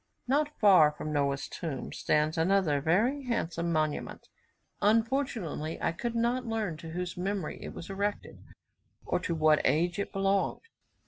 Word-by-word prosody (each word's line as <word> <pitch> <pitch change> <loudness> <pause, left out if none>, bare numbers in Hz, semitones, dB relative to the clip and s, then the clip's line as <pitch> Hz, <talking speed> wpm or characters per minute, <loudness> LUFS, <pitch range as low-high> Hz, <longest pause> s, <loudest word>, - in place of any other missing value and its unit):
Not 295 +3 +1
far 185 -8 +7
from 150 0 -5
Noah's 140 -1 0
tomb 155 -7 -5
stands 150 +1 +1
another 165 -4 +2
very 230 - +1
handsome 170 -8 -1
monument; 155 -2 -2 0.5
unfortunately 220 - 0
I - - 0
could 235 +8 -4
not 240 +2 +1
learn 220 -7 -2
to 165 0 -9
whose 175 +2 -4
memory 190 -2 -3
it - - -7
was 170 - -8
erected, 200 +1 -3 0.6
or - - 0
to 170 - -2
what 155 -1 +4
age 175 +4 +1
it 200 - -3
belonged. 195 0 0
180 Hz, 145 wpm, -30 LUFS, 155-220 Hz, 0.6 s, far